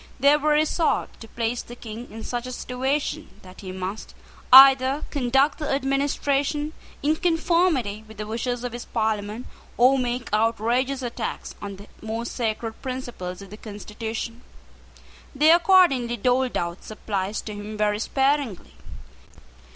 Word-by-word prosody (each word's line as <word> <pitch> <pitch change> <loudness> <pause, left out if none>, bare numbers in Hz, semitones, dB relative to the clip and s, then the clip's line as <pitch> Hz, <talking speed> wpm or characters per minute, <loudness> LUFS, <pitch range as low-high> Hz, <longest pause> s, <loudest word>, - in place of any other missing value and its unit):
They 280 +3 +6
were 300 0 0
resolved 310 +2 +1
to 225 - -9
place 230 +2 -2
the 240 - -11
King 230 0 -9
in 220 +1 -9
such 245 0 -4
a - - -5
situation 270 +5 -2
that 185 0 -13
he 190 -2 -7
must 190 +3 -6 0.4
either 270 +2 +8
conduct 270 +2 +2
the 300 - -3
administration 280 +2 0 0.3
in 305 +2 +2
conformity 325 - +1
with 220 -1 -13
the 210 - -4
wishes 235 +3 -3
of 245 -2 -4
his 240 - -6
Parliament, 215 +2 -2 0.3
or 260 +3 +5
make 245 -2 -3
outrageous 235 +5 +1
attacks 235 -2 -4
on 200 -1 -6
the 200 +2 -13
most 225 +2 -4
sacred 225 -1 -3
principles 240 -8 -6
of 195 - -14
the 210 - -9
constitution. 220 +2 -6 0.9
They 305 +4 +6
accordingly 335 -9 +4
doled 250 +3 +1
out 170 +1 -4
supplies 205 -1 -3
to 215 - -7
him 205 +1 -7
very 210 0 +1
sparingly. 270 -5 0
245 Hz, 145 wpm, -24 LUFS, 215-275 Hz, 0.9 s, either